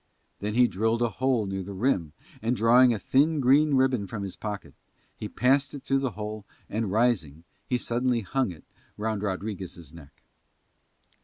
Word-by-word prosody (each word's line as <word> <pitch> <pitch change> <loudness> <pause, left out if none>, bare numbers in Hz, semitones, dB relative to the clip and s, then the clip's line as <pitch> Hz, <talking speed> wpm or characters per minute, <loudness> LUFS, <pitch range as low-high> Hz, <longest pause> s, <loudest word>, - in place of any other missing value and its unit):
Then 105 +1 -3
he 125 +1 +6
drilled 115 +4 0
a 120 - +2
hole 130 0 +1
near 95 0 -3
the 100 +1 -7
rim 95 - 0 0.3
and, 115 +3 0
drawing 120 +3 +6
a 115 - 0
thin 145 +8 +2
green 140 +3 +4
ribbon 130 -6 +2
from 105 0 -5
his 95 - -5
pocket, 105 -2 -6 0.4
he - - -6
passed 135 +2 +2
it 140 - -8
through 135 0 +1
the 135 -4 -2
hole 105 0 -5 0.2
and, 110 -2 -2
rising, 100 - +1 0.2
he 125 - +1
suddenly 120 0 0
hung 130 +4 -1
it 85 -3 -10 0.3
round 110 -1 -2
Rodriguez' 95 -5 -5
neck. 75 -4 -15
110 Hz, 170 wpm, -27 LUFS, 100-130 Hz, 0.4 s, he